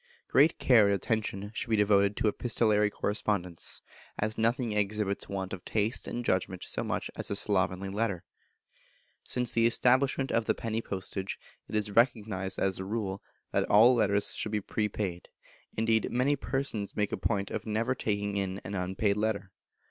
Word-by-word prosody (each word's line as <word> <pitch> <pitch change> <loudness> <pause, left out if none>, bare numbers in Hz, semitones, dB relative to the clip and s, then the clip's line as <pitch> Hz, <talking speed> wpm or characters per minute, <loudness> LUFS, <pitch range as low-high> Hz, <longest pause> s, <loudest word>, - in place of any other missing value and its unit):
Great 150 +5 +4
care 115 -5 +5
and 100 - +3
attention 105 -1 -2
should 115 - -4
be 110 - +3
devoted 100 -1 +3
to - - +1
epistolary 105 -2 +2
correspondence, 100 -4 -2 0.3
as 110 +1 -1
nothing 115 +1 +1
exhibits 105 -1 -1
want 95 -1 -4
of 90 - -6
taste 110 +1 0
and 120 0 -4
judgment 95 -1 0
so - - -2
much - - -3
as - - -2
a 100 - -1
slovenly 95 -1 +1
letter. 100 -2 -2 1.0
Since 125 -2 -2
the 115 0 +3
establishment 130 +3 +2
of 115 -1 +1
the - - +1
penny 115 0 -2
postage 95 -1 -4 0.3
it - - -4
is 105 -1 0
recognised 105 -4 +1
as 95 -1 +1
a - - -3
rule 100 -1 -3 0.3
that - - +1
all 115 +5 +7
letters 100 -4 +1
should 105 - -3
be 105 - +1
prepaid; 100 -3 -3 0.5
indeed, 110 0 +2
many 130 +4 +2
persons 135 -6 -3
make 105 -1 0
a - - 0
point 100 0 -1
of - - -4
never 115 +4 0
taking 100 -4 -2
in 95 -1 -2
an 100 - -6
unpaid 95 +2 0
letter. 105 -3 -1
105 Hz, 170 wpm, -30 LUFS, 100-115 Hz, 1.0 s, all